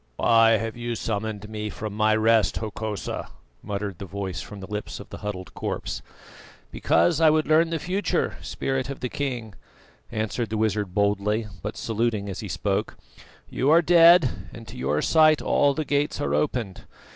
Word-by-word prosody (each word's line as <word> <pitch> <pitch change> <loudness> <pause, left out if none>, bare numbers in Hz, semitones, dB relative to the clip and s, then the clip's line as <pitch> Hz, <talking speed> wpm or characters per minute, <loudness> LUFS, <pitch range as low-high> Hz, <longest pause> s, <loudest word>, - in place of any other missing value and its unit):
"Why 115 - +5
have 115 0 -4
you 120 0 -4
summoned 110 -1 -3
me 105 0 -5
from 110 0 -6
my 110 +1 +3
rest, 110 0 +3
Hokosa?" 110 -2 -4 0.3
muttered 100 -2 -4
the 100 - -6
voice 95 -1 -4
from 105 - -9
the 95 - -7
lips 105 +1 -5
of - - -10
the - - -8
huddled 95 -3 -6
corpse. - - -4 0.7
"Because 165 -2 +2
I 160 - +7
would 155 0 +2
learn 160 +2 +4
the 165 - -1
future, 185 +5 -1
Spirit 135 -1 -3
of 140 - -6
the 125 - -2
king," 120 -7 -4 0.6
answered 110 +1 -2
the 110 - -2
wizard 105 -3 -1
boldly, 105 +2 +1 0.2
but - - -5
saluting 110 -2 -1
as 95 - -5
he 110 - -5
spoke. 95 +2 -2 0.5
"You 135 - 0
are 165 +3 +6
dead, 165 - +5
and 115 -1 -11
to - - -10
your 75 +4 -1
sight 155 -1 +5
all 140 -1 +2
the 155 - -2
Gates 145 +1 0
are 70 - -1
opened. 95 - -2
110 Hz, 175 wpm, -25 LUFS, 100-135 Hz, 0.7 s, I